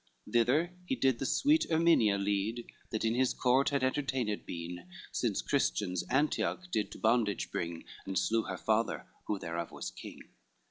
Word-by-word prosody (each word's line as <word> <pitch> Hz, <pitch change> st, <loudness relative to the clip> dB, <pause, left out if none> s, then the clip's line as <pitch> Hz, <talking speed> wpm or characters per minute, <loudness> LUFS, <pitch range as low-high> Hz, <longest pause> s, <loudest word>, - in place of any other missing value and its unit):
Thither 130 Hz, +9 st, +2 dB
he 265 Hz, -, 0 dB
did 130 Hz, -, +2 dB
the 135 Hz, -, -1 dB
sweet 300 Hz, +3 st, +3 dB
Erminia 160 Hz, -11 st, +4 dB
lead, 105 Hz, +4 st, -1 dB, 0.2 s
That 110 Hz, 0 st, -2 dB
in 110 Hz, -, +2 dB
his 130 Hz, +1 st, +1 dB
court 130 Hz, +2 st, +3 dB
had 140 Hz, -2 st, 0 dB
entertained 130 Hz, -5 st, -1 dB
been 85 Hz, +1 st, -6 dB, 0.2 s
Since -, -, -1 dB
Christians 90 Hz, -3 st, 0 dB
Antioch 150 Hz, +6 st, 0 dB
did 105 Hz, -8 st, 0 dB
to -, -, -9 dB
bondage 110 Hz, -3 st, +1 dB
bring, 85 Hz, -1 st, -3 dB, 0.2 s
And 95 Hz, -1 st, -2 dB
slew 115 Hz, 0 st, +2 dB
her -, -, -4 dB
father, 110 Hz, +1 st, 0 dB, 0.2 s
who 105 Hz, -, 0 dB
thereof 85 Hz, -2 st, -4 dB
was -, -, -6 dB
king. -, -, -10 dB
115 Hz, 165 wpm, -32 LUFS, 100-135 Hz, 0.2 s, Erminia